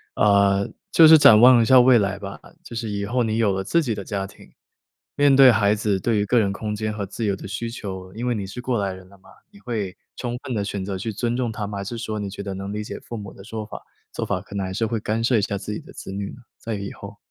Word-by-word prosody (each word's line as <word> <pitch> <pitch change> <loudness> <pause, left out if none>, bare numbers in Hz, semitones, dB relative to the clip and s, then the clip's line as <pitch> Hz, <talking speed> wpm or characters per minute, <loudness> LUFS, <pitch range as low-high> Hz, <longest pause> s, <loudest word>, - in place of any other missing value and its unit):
呃， 100 -1 +3 0.2
就 160 -1 +8
是 160 0 +9
展 140 -7 +8
望 120 0 +8
一 - - +3
下 130 +2 +7
未 125 -1 +6
来 100 -1 -1
吧， 100 -1 -8 0.2
就 120 - -10
是 115 -1 -3
以 100 -1 -3
后 120 +3 0
你 110 0 -1
有 105 -4 +2
了 95 - -2
自 170 - +2
己 115 -7 -2
的 100 - -6
家 95 0 -3
庭， 100 - -17 0.6
面 145 -1 +4
对 135 -2 +8
孩 105 -2 +3
子 105 -2 0
对 115 0 0
于 105 - +1
个 120 +4 +3
人 100 -3 +1
空 105 +1 -4
间 110 0 -2
和 100 -2 -4
自 110 +4 -5
由 100 -2 +1
的 95 - -9
需 115 +4 -4
求， 95 -5 -7
因 115 +4 -5
为 125 - +1
你 100 -3 -4
是 125 +5 -7
过 125 -4 -1
来 95 -1 -2
人 95 0 -12
了 100 - -18
嘛， - - -20 0.2
你 205 - -17
会 105 - -4 0.2
充 120 -1 -4
分 125 - -4
地 105 - -1
选 100 -2 -4
择 95 -1 -4
去 110 +3 -4
尊 120 +3 -2
重 120 -3 -1
他 105 -2 -4
吗？ 100 - -6
还 - - -4
是 115 +3 -6
说 110 -1 -4
你 100 -2 -4
觉 100 - -7
得 100 -1 -5
能 100 +1 -5
理 105 0 -3
解 - - -7
父 120 - -9
母 100 -3 -7
的 95 - -14
说 110 +1 -6
法 105 - -8 0.3
做 - - -4
法， 90 - -2
可 100 0 -11
能 95 - -1
还 95 - -5
是 110 +3 -1
会 115 -1 -2
干 110 +2 -2
涉 120 -1 +3
一 - - +2
下 100 - -2
自 100 +2 -5
己 105 - -3
的 - - -14
子 - - -8
女 100 0 -4
呢， 125 - -13 0.2
在 115 - -5
以 100 -1 -5
后？ - - -11
105 Hz, 320 characters per minute, -23 LUFS, 100-115 Hz, 0.6 s, 是